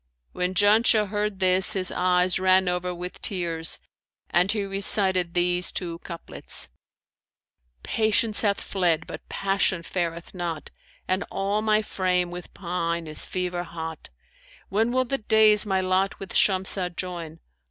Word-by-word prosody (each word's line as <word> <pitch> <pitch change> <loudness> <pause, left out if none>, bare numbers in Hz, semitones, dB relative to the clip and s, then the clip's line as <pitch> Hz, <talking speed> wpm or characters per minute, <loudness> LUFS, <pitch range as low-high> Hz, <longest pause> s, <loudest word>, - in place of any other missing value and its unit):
When 180 +1 -2
Janshah 210 +1 +4
heard 210 -1 -2
this 185 +2 +4
his 185 -3 +3
eyes 180 0 +2
ran 185 0 +3
over 180 0 -1
with 180 +1 -7
tears 170 -4 -1 0.5
and 180 +3 +3
he 210 -2 -1
recited 190 -2 +4
these 175 0 +3
two 170 -2 -4
couplets, 170 -2 -6 1.1
'Patience 220 0 +2
hath 200 -2 +1
fled, 175 -4 0
but - - -10
passion 195 -3 0
fareth 170 -1 -4
not; 170 -4 -5 0.2
* - - -31
And 185 +2 0
all 200 +2 -1
my 215 0 +2
frame 180 -3 0
with 180 0 -8
pine 170 -2 -3
is 155 -1 -4
fever 180 -1 -3
hot: 160 -2 -7 0.6
When 220 +4 +1
will 255 +1 +1
the 270 +2 -2
days 215 -1 +4
my 190 -1 +1
lot 185 +1 0
with 195 - -8
Shamsah 185 -2 +1
join? 170 -3 -5
185 Hz, 140 wpm, -25 LUFS, 175-200 Hz, 1.1 s, Janshah